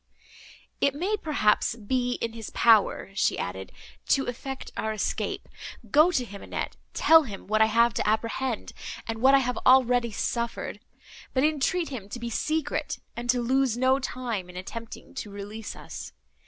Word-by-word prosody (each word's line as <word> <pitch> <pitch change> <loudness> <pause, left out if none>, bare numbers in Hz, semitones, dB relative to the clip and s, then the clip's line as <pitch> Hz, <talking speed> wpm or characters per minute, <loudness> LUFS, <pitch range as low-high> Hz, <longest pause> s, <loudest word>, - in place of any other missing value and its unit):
"It 280 0 +3
may, 375 +8 0
perhaps, 285 - +1
be 245 +3 -1
in 230 -2 -3
his 225 -2 -7
power," 220 -3 +4
she 200 +1 +1
added, 95 +1 -5 0.4
"to 270 - +3
effect 260 +2 -6
our 220 0 -1
escape. 215 - -2 0.4
Go 310 +5 +6
to 255 -8 0
him, 200 -3 -10
Annette, - - -4 0.2
tell 320 0 +7
him 215 -10 -7
what 215 +1 +1
I 220 - +7
have 235 +1 +4
to - - 0
apprehend, 230 +2 -1 0.3
and 225 0 -4
what 270 +2 +7
I - - +6
have 250 - -1
already 250 -2 +5
suffered; 235 +3 -3 0.6
but 260 - +3
entreat 310 +3 +1
him 225 -8 -7
to 240 - -6
be 235 0 -4
secret, 310 +7 -1 0.2
and 240 +1 -6
to 245 0 +3
lose 260 -1 +2
no 260 +2 +3
time 235 -8 -4
in 180 - -10
attempting 225 +5 -8
to 210 - -6
release 205 +2 -7
us. - - -8
235 Hz, 170 wpm, -27 LUFS, 215-265 Hz, 0.6 s, tell